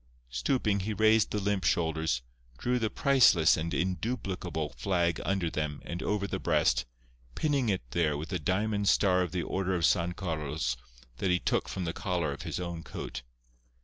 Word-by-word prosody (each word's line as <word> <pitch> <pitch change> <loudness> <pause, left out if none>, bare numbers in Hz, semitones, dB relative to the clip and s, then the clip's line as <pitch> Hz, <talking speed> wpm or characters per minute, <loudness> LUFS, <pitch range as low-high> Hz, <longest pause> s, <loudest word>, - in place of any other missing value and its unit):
Stooping 100 - +1
he 105 +3 -3
raised 110 0 +4
the 105 - -1
limp 100 -1 0
shoulders, 80 -6 +1 0.3
drew 125 - 0
the 110 -2 0
priceless 120 - +5
and 80 +1 -3
induplicable 90 - -2
flag 85 +4 0
under 95 -3 0
them 75 -1 -2
and 85 +1 -5
over 105 -1 0
the - - -3
breast, - - +2 0.5
pinning 140 -6 +1
it 95 -8 0
there 75 -3 +1
with 75 +3 -6
the 90 -1 -2
diamond 100 +5 +1
star 90 -2 +4
of 90 -3 -1
the 90 -1 -1
Order 95 0 -1
of 85 -2 +2
San 85 +1 +2
Carlos 75 -8 -2 0.4
that 95 - 0
he 90 - +4
took - - 0
from 95 - -3
the 80 - -2
collar 85 -5 -1
of 70 - -6
his - - -4
own 85 -2 -4
coat. 65 -5 -6
90 Hz, 180 wpm, -30 LUFS, 80-100 Hz, 0.5 s, priceless